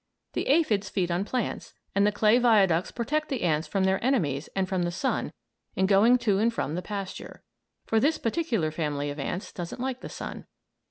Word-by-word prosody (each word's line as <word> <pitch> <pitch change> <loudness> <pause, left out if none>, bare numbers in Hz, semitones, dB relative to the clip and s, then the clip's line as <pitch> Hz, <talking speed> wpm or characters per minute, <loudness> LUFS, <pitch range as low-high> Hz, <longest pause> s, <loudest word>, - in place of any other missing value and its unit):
The - - -2
aphids 225 - +2
feed 180 -3 -1
on 175 +3 0
plants, 250 0 -3 0.2
and 200 +1 +3
the - - +3
clay 215 +3 +4
viaducts 195 -8 +4
protect 300 +6 -2
the 265 -4 -2
ants 155 -2 +1
from 190 +4 0
their 190 +2 +1
enemies 160 - 0
and 190 -1 0
from 185 -1 -1
the 175 - 0
sun 190 +10 -1 0.4
in 190 - +2
going 205 +6 +5
to 200 -3 +3
and 230 +2 +3
from 155 -10 -3
the 180 - -2
pasture; 195 0 -7 0.4
for 225 - +2
this 300 +7 +2
particular 230 - -1
family 145 -2 -2
of 145 - -7
ants 180 +7 -4
doesn't 175 +3 -6
like 260 0 -3
the - - -7
sun. - - -7
200 Hz, 200 wpm, -27 LUFS, 175-235 Hz, 0.4 s, going